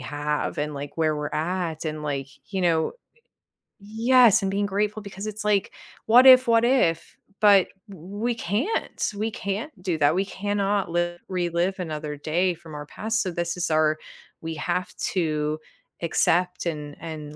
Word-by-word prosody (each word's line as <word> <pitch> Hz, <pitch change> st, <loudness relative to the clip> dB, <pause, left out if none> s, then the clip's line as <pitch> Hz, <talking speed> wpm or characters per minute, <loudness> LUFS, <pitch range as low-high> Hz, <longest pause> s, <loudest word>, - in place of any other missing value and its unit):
have 150 Hz, +2 st, -3 dB
and, 150 Hz, 0 st, -2 dB
like, 140 Hz, 0 st, -7 dB
where 155 Hz, -2 st, +1 dB
we're 150 Hz, 0 st, -3 dB
at, 165 Hz, 0 st, -2 dB
and, 155 Hz, -1 st, -4 dB
like, 140 Hz, -2 st, -3 dB, 0.3 s
you 190 Hz, -, -1 dB
know, 165 Hz, -3 st, +2 dB
i -, -, -8 dB, 1.0 s
Yes, 230 Hz, +1 st, +5 dB
and 195 Hz, -, -1 dB
being 200 Hz, +1 st, 0 dB
grateful 205 Hz, +2 st, -1 dB
because 200 Hz, 0 st, -7 dB
it's 215 Hz, 0 st, -5 dB
like, 205 Hz, -1 st, +1 dB, 0.3 s
"What 245 Hz, +4 st, +7 dB
if? 255 Hz, -1 st, +9 dB
What 230 Hz, 0 st, +4 dB
if?" 235 Hz, -10 st, +1 dB, 0.2 s
But 200 Hz, -3 st, +6 dB, 0.2 s
we 200 Hz, +6 st, -4 dB
can't, 230 Hz, -, -2 dB
we 215 Hz, +2 st, -1 dB
can't 210 Hz, +7 st, -4 dB
do 180 Hz, -4 st, -1 dB
that, 150 Hz, +1 st, +3 dB
we 190 Hz, -, +2 dB
cannot 200 Hz, 0 st, -1 dB
live 175 Hz, 0 st, -1 dB
relive 180 Hz, +1 st, -1 dB
another 150 Hz, -3 st, -4 dB
day 170 Hz, +5 st, 0 dB
from 160 Hz, -2 st, -12 dB
our 145 Hz, 0 st, -6 dB
past, 220 Hz, +8 st, -1 dB
so 185 Hz, -, -2 dB
this 175 Hz, +1 st, -3 dB
is 175 Hz, -, -1 dB
our 155 Hz, 0 st, +2 dB, 0.4 s
we 165 Hz, 0 st, -4 dB
have 175 Hz, +3 st, -3 dB, 0.2 s
to 155 Hz, -3 st, -1 dB, 0.4 s
accept 175 Hz, +2 st, +1 dB
and 150 Hz, -3 st, -4 dB
and 155 Hz, -2 st, -7 dB
175 Hz, 165 wpm, -25 LUFS, 155-205 Hz, 1.0 s, if